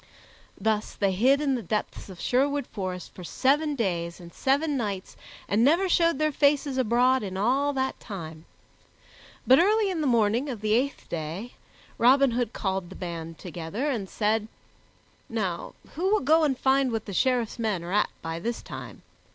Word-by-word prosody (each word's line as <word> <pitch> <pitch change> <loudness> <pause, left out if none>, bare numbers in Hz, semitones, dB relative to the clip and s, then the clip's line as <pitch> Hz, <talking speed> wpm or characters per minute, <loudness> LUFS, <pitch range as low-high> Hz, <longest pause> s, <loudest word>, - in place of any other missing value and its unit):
Thus 215 +1 -1
they 200 -2 +1
hid 255 +9 +3
in 280 -2 +1
the 250 - -1
depths 210 +1 -3
of 185 -2 -10
Sherwood 280 +2 +1
Forest 185 -5 -6
for 180 - -10
seven 290 - +1
days 170 -7 -2
and 170 -1 -12
seven 285 +3 +1
nights 205 -7 -3 0.3
and 210 +3 +2
never 335 +8 +4
showed 335 -4 +3
their 310 +1 +1
faces 285 -1 +2
abroad 250 +2 +3
in 190 -2 -5
all 265 +8 +2
that 265 -1 -2
time; 165 -6 -8 1.0
but 260 +1 +7
early 415 +2 +3
in 340 -4 -2
the 295 - +1
morning 235 +3 +2
of 235 -6 -5
the 215 0 +1
eighth 265 +5 0
day 170 +8 -5 0.5
Robin 265 +2 +5
Hood 235 -1 -1
called 190 -5 -3
the 190 - -10
band 165 -2 -6
together 180 - -4
and 205 -7 -3
said, 215 0 0 0.8
"Now 195 -7 -3 0.2
who 360 +5 0
will 430 - +3
go 315 +4 +4
and 270 -4 0
find 265 -1 +2
what 225 -1 -3
the 200 - -6
Sheriff's 245 +1 +1
men 210 -6 -1
are 175 +2 -5
at 210 - +3
by 165 0 -4
this 230 +6 -4
time? - - -9
235 Hz, 175 wpm, -26 LUFS, 190-275 Hz, 1.0 s, but